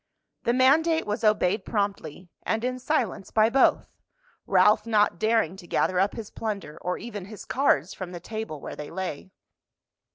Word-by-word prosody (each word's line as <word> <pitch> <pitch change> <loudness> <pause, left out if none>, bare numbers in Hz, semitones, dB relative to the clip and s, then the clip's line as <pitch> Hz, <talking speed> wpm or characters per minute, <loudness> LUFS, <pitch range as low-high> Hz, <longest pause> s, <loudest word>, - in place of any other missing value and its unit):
The 235 - +3
mandate 315 +6 +3
was 210 +3 -3
obeyed 210 -2 +2
promptly 195 -5 -3
and 225 +1 -1
in 255 0 -2
silence 250 - -1
by 220 +1 +3
both, 270 +1 +2 0.5
Ralph 210 +4 +4
not 210 -6 +2
daring 220 -5 +1
to 180 -3 -12
gather 180 +1 +1
up 195 +2 +2
his 220 -3 -7
plunder, 200 -8 -5
or 180 0 -2
even 210 -5 -7
his 210 +1 -10
cards 195 - +1
from 185 -2 -7
the 175 - -7
table 215 -5 -6
where - - -7
they 150 - -7
lay. 185 -2 -5
210 Hz, 165 wpm, -26 LUFS, 185-230 Hz, 0.5 s, Ralph